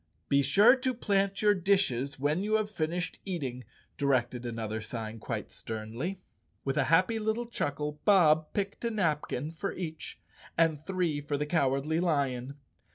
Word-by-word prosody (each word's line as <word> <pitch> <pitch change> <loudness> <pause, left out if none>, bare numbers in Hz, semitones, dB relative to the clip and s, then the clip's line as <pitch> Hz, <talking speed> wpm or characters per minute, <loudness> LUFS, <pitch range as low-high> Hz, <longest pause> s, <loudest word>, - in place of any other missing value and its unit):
" - - -43
Be 140 0 +4
sure 205 - +6
to 255 -1 -1
plant 200 -3 0
your 210 -1 +6
dishes 170 -9 +1
when 150 +6 +1
you 215 +2 +1
have 215 -1 0
finished 170 -1 -2
eating," 135 -10 -4 0.4
directed 125 -3 +1
another 110 -2 -3
sign 110 0 -6
quite - - -4
sternly. 115 - -5 0.4
With 135 - 0
a 140 -3 +2
happy 185 - +3
little 220 +2 -1
chuckle, 150 -8 -3
Bob 160 -6 +5
picked 200 +2 -3
a 235 - +1
napkin 155 - -1
for 180 +4 -4
each, 160 -3 -6 0.4
and 160 -3 +2
three 175 -6 0
for 145 0 -2
the 150 - -1
Cowardly 150 0 +1
Lion. 140 -6 0
155 Hz, 160 wpm, -30 LUFS, 135-195 Hz, 0.4 s, sure